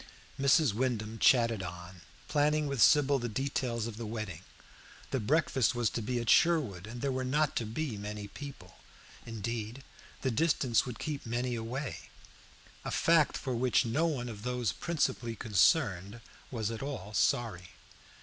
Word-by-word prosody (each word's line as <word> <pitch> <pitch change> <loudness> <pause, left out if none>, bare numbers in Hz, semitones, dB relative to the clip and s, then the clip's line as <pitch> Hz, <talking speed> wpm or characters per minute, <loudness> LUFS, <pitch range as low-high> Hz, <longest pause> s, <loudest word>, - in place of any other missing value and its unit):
Mrs. 140 -2 +4
Wyndham 115 -2 -2
chatted 115 -4 +4
on, 90 0 -8 0.3
planning 150 +1 +2
with 140 -4 -1
Sybil 140 +9 +5
the 120 0 -3
details 120 -1 -2
of 115 -2 -6
the 115 - -5
wedding. 105 -6 -5 0.7
The 135 - 0
breakfast 130 0 +2
was 120 -3 +1
to 115 - -3
be 120 +3 -1
at 115 - -4
Sherwood, 125 - +3
and 120 +2 -7
there 140 - 0
were 130 0 -2
not 145 +3 +1
to 115 - -1
be 120 0 -3
many 105 0 -6
people. 115 -5 -10 0.5
Indeed, 115 +2 -4 0.4
the 130 - +1
distance 130 -3 +2
would 120 -3 -5
keep 150 -2 -4
many 120 +2 -1
away, 120 +4 -5 0.7
a - - -4
fact 165 -3 +3
for 130 - -3
which 125 0 +2
no 140 +9 +1
one 130 -6 -2
of 110 -3 -7
those 125 -3 -1
principally 130 - -1
concerned 100 - +2 0.3
was 115 -3 -2
at 115 - -5
all 125 -8 -5
sorry. 95 -3 0
120 Hz, 160 wpm, -31 LUFS, 110-135 Hz, 0.7 s, Sybil